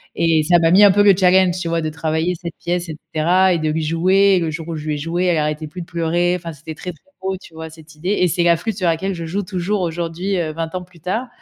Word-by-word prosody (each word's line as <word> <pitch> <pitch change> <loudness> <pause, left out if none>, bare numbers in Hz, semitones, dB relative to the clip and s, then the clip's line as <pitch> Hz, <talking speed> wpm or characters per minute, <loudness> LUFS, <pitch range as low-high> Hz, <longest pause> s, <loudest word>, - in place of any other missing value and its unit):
et 165 -2 +3
ça 175 +3 +4
m'a 165 0 +3
mis 195 +4 +7
un 200 - +7
peu 205 +2 +4
le 200 - +7
challenge, 185 -1 +4
tu 170 - -4
vois? 165 0 0
De 155 - -2
travailler 160 +2 -1
cette 170 -2 -6
pièce 175 0 -2
et 155 - -6 0.2
cetera 180 +4 +3
et 170 - 0
de 155 - -1
lui 160 +1 -1
jouer 185 +5 +3
et - - +2
le 165 -2 -1
jour 160 +1 -6
où 165 - -3
je 155 0 -7
lui 150 - 0
ai - - -4
jouée, 170 +5 -2
elle 175 -3 +2
arrêtait 150 0 -2
plus 175 +4 -8
de - - -7
pleurer, 175 +1 0
enfin, 170 -1 -7
c'était 155 +2 -9
très, 180 +3 -6
très 160 - -24 0.2
beau, 190 0 -2
tu 170 - -16
vois, 160 0 -8
cette 160 0 -15
idée 170 +5 -5
et 180 - +4
c'est 175 +1 0
la 170 -1 +4
flûte 210 +5 -4
sur 185 -4 0
laquelle 180 +4 0
je 170 -1 -6
joue 195 +5 -2
toujours 185 +1 -2
aujourd'hui, 175 +3 -2
heu, 160 -3 -1
20 165 +1 -4
ans 185 - -2
plus 180 -1 -19
tard 215 +9 -2
170 Hz, 300 wpm, -19 LUFS, 160-185 Hz, 0.2 s, mis